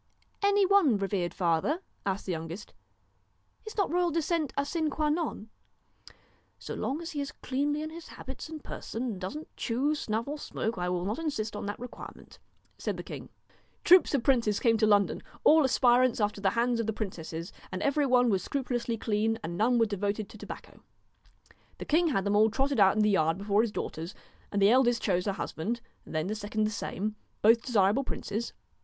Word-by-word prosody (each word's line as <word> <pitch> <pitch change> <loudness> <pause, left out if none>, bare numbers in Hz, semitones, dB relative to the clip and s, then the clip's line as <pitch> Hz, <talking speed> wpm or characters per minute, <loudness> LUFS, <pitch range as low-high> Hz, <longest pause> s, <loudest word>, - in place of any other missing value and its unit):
'Any 405 0 +4
one, 370 - +4
revered 195 -3 -1
father?' 175 - +1 0.3
asked 195 0 -1
the 190 - -2
youngest. 165 +4 -6 0.5
' - - -41
Is 435 - -8
not 400 -5 +1
royal 350 0 +2
descent 325 -1 0
a 280 - +1
sine 315 +1 -1
qua 300 +1 0
non? 300 -8 -2 0.3
' - - -22
' - - -33 0.3
So - - -7
long 290 +6 -2
as 330 - -5
he 290 - -3
is 280 - -4
cleanly 290 +3 -2
in 310 - -5
his 335 0 -9
habits 265 +3 -8
and 315 -2 -8
person, 230 - -5
and 220 -7 -4
doesn't 295 +12 -6
chew, 265 +6 0
snuff, 230 -5 -2
or 295 +1 -4
smoke, 225 -7 -3
I 180 0 -1
will 180 0 -1
not 210 +7 -2
insist 225 -10 -2
on 205 - -4
that 205 - -4
requirement,' 245 0 -10 0.4
said - - -2
the - - -6
king. - - -8 0.5
Troops 360 -4 +6
of 255 - 0
princes 235 -7 +2
came 230 -1 +3
to 215 0 +3
London, 205 -1 +3 0.2
all 315 0 +7
aspirants 255 -2 +4
after 205 -1 0
the 195 - +3
hands 240 0 +2
of 230 - -1
the 220 - 0
princesses, 170 -5 -5 0.2
and 185 - -3
every 285 0 +2
one 250 -2 +4
was 190 -2 +1
scrupulously 245 -4 -2
clean, 220 +1 0
and 170 +2 -4
none 235 +6 +3
were 230 - +4
devoted 205 0 -2
to - - -12
tobacco. - - -9 1.0
The - - -7
king 335 +3 +3
had 230 -11 +1
them 200 +1 +1
all 215 +2 +5
trotted 270 +3 0
out 195 0 +6
in 215 - +3
the 210 - +4
yard 165 -3 +2
before 205 +1 +2
his 230 -2 -1
daughters, 165 -2 -5 0.4
and 205 - 0
the 200 +2 +6
eldest 240 -1 +3
chose 180 -1 +1
her 200 - +1
husband, 205 +5 -3 0.3
then 155 0 -2
did 195 - -3
the 215 - -3
second 215 +1 -1
the 215 - +1
same, 210 0 -3 0.3
both 225 +2 +6
desirable 220 +1 +2
princes. 235 -2 -4
225 Hz, 205 wpm, -29 LUFS, 200-280 Hz, 1.0 s, all